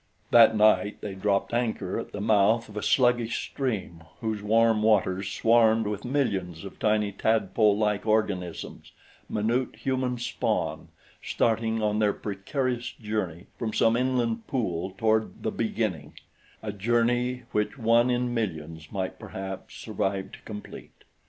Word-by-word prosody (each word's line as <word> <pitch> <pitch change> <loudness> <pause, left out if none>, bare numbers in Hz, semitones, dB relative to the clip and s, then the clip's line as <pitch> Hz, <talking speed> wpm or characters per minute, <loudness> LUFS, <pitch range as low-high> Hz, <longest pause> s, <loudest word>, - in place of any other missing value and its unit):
That 115 -1 +7
night 105 -1 +3
they 100 - -5
dropped 100 +2 0
anchor 110 -6 -1
at - - -7
the 105 - -6
mouth 110 +2 +3
of 105 - -13
a 105 - -3
sluggish 120 -2 +2
stream 105 -11 -3 0.2
whose 110 -2 -2
warm 110 +1 +3
waters 100 -3 +2
swarmed 115 -1 +4
with 105 -1 -3
millions 100 - -1
of 100 - -10
tiny 105 -1 +2
tadpolelike 105 0 +1
organisms 100 -5 -2 0.4
minute 115 +4 0
human 130 -2 -1
spawn 120 - -2 0.3
starting 115 -1 0
on 105 0 +1
their 105 -2 +3
precarious 120 +5 -3
journey 100 -6 -4
from 110 -2 -2
some 115 0 +3
inland 120 -2 0
pool 95 -8 -2
toward 110 +1 0
"the - - 0
beginning" - - -2 0.5
a 105 - -3
journey 120 +4 +1
which 105 +6 -1
one 120 +1 +3
in 125 0 0
millions, 80 -8 -4
perhaps, 95 +2 -4
might 95 0 -7
survive 95 0 -2
to - - -12
complete. 105 -1 -10
110 Hz, 135 wpm, -27 LUFS, 100-115 Hz, 0.5 s, That